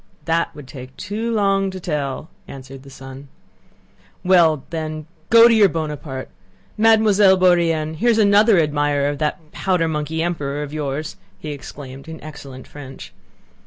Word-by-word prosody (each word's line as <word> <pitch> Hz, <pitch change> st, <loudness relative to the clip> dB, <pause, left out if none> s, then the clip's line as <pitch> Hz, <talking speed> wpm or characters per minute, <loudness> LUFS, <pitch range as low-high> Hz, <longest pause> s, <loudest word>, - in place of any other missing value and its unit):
"That 165 Hz, -1 st, -1 dB
would 145 Hz, -3 st, -11 dB
take 130 Hz, -1 st, -11 dB
too 215 Hz, +4 st, -4 dB
long 195 Hz, -3 st, +1 dB
to 190 Hz, 0 st, -7 dB
tell," 150 Hz, -4 st, -4 dB, 0.2 s
answered 135 Hz, 0 st, -10 dB
the 135 Hz, -, -14 dB
son. 135 Hz, +1 st, -11 dB, 1.0 s
"Well, 170 Hz, -6 st, +4 dB
then 155 Hz, -2 st, -5 dB, 0.2 s
go 230 Hz, 0 st, +7 dB
off 235 Hz, -, +8 dB
to -, -, +4 dB
your 210 Hz, -3 st, +5 dB
Buonaparte! 150 Hz, -5 st, -5 dB, 0.4 s
Mademoiselle 210 Hz, -3 st, +4 dB
Bourienne, 165 Hz, -4 st, +2 dB
here's 235 Hz, +2 st, +2 dB
another 210 Hz, 0 st, +5 dB
admirer 145 Hz, -2 st, +1 dB
of 145 Hz, -1 st, -5 dB
that 155 Hz, +1 st, -3 dB
powder 180 Hz, -4 st, 0 dB
monkey 160 Hz, +1 st, -2 dB
emperor 150 Hz, -4 st, -3 dB
of 145 Hz, 0 st, -8 dB
yours," 150 Hz, 0 st, -4 dB, 0.2 s
he 150 Hz, -, -7 dB
exclaimed 135 Hz, 0 st, -10 dB
in 160 Hz, 0 st, -8 dB
excellent 140 Hz, -4 st, -10 dB
French. 135 Hz, -2 st, -11 dB
155 Hz, 150 wpm, -20 LUFS, 145-190 Hz, 1.0 s, off